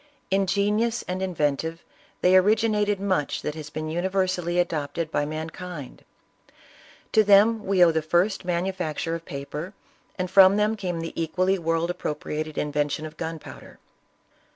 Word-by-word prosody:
Ingenious 205 Hz, +4 st, +1 dB
and 185 Hz, +1 st, -4 dB
inven 150 Hz, -7 st, 0 dB
tive, 165 Hz, +1 st, -5 dB, 0.4 s
they 180 Hz, +1 st, +5 dB
originated 210 Hz, +1 st, +3 dB
much 185 Hz, -7 st, -1 dB
that 150 Hz, -, -2 dB
has 155 Hz, -1 st, -8 dB
been 155 Hz, +1 st, -5 dB
universally 180 Hz, +1 st, -1 dB
adopted 160 Hz, -2 st, -1 dB
by 145 Hz, -, 0 dB
mankind. 160 Hz, -1 st, -7 dB, 1.1 s
To 220 Hz, -, +5 dB
them 210 Hz, +2 st, +5 dB
we 190 Hz, -2 st, +5 dB
owe 165 Hz, -, +4 dB
the 160 Hz, 0 st, 0 dB
first 175 Hz, +6 st, +1 dB
manu 180 Hz, +1 st, -1 dB
facture 165 Hz, -3 st, -3 dB
of 165 Hz, 0 st, -5 dB
paper, 150 Hz, +7 st, -6 dB, 0.4 s
and 185 Hz, -1 st, -3 dB
from 190 Hz, 0 st, +7 dB
them 210 Hz, +1 st, +2 dB
came 180 Hz, -5 st, -3 dB
the 165 Hz, -, -5 dB
equally 185 Hz, +4 st, 0 dB
world 165 Hz, +1 st, 0 dB
appropriated 155 Hz, -2 st, -4 dB
invention 150 Hz, +1 st, -1 dB
of 155 Hz, 0 st, -9 dB
gunpowder. 160 Hz, -1 st, -8 dB
175 Hz, 145 wpm, -25 LUFS, 155-195 Hz, 1.1 s, from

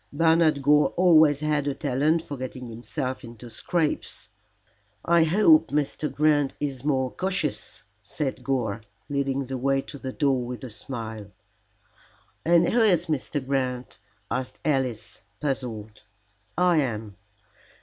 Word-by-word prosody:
"Bernard 160 Hz, -1 st, +3 dB
Gore 150 Hz, +1 st, +5 dB
always 160 Hz, -5 st, +5 dB
had 150 Hz, -2 st, 0 dB
a 140 Hz, -, -1 dB
talent 150 Hz, +4 st, +1 dB
for 145 Hz, -, -6 dB
getting 130 Hz, -1 st, -6 dB
himself 120 Hz, +3 st, -5 dB
into 115 Hz, 0 st, -10 dB
scrapes." 165 Hz, +2 st, -2 dB, 0.8 s
"I 170 Hz, -1 st, +4 dB
hope 165 Hz, -2 st, +5 dB
Mr. 150 Hz, +1 st, -1 dB
Grant 145 Hz, -2 st, +2 dB
is 135 Hz, -3 st, -3 dB
more 130 Hz, -3 st, 0 dB
cautious," 185 Hz, -6 st, -1 dB, 0.2 s
said 130 Hz, +4 st, -4 dB
Gore, 120 Hz, -5 st, -1 dB, 0.3 s
leading 140 Hz, -1 st, -1 dB
the 130 Hz, 0 st, -5 dB
way 135 Hz, +1 st, +2 dB
to 140 Hz, -, -10 dB
the 130 Hz, -, -5 dB
door 135 Hz, -3 st, +1 dB
with 125 Hz, +1 st, -6 dB
a 125 Hz, -, -7 dB
smile. 110 Hz, -3 st, -6 dB, 1.2 s
"And 170 Hz, +1 st, +4 dB
who 240 Hz, -, +3 dB
is 180 Hz, -6 st, +4 dB
Mr. 145 Hz, -3 st, -2 dB
Grant?" 130 Hz, -2 st, -2 dB, 0.3 s
asked 130 Hz, -1 st, -3 dB
Alice, 130 Hz, -7 st, -1 dB, 0.2 s
puzzled. 115 Hz, -7 st, -4 dB, 0.6 s
"I 180 Hz, -1 st, +4 dB
am. 110 Hz, -7 st, -2 dB
140 Hz, 130 wpm, -25 LUFS, 125-155 Hz, 1.2 s, Gore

